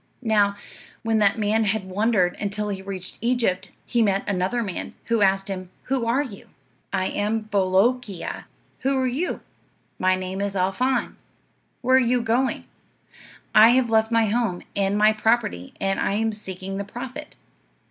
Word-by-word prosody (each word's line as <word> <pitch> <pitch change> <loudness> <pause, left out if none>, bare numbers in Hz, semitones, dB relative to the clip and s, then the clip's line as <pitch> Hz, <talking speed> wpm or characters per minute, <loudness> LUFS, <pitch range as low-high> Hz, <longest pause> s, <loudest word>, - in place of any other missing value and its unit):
"Now, 205 -3 +3 0.5
when 225 -1 +2
that 205 0 +3
man 220 +1 +1
had 210 0 0
wandered 190 -1 +1
until 205 +1 -2
he 195 -2 -4
reached 190 -2 -7
Egypt, 235 -6 0 0.2
he 240 - +1
met 200 -2 +1
another 195 +5 0
man, 190 -4 -5
who 230 -2 +1
asked 195 0 +3
him, 185 -2 -5
'Who 255 -3 -1
are 255 +5 +2
you?' 215 -8 -10 0.4
"'I 185 - 0
am 210 +2 -1
Bolookeea. 200 0 0 0.3
Who 270 +1 +1
are 260 - +1
you?' 270 +8 -2 0.6
"'My 185 0 +3
name 185 +1 -4
is 200 -1 -2
Al 185 0 +1
Faan'. 255 +5 0 0.6
Where 260 +1 +4
are - - +6
you 245 -1 +2
going?' 240 +4 0 0.9
"'I 215 +1 +9
have 245 -1 +3
left 220 0 +3
my 230 -1 +4
home, 215 -4 -1
and 200 0 +1
my 215 +1 +5
property, 215 - 0
and 195 0 0
I - - 0
am 220 +2 +1
seeking 195 -2 -6
the - - -2
prophet. 240 +5 -8
210 Hz, 165 wpm, -24 LUFS, 195-235 Hz, 0.9 s, I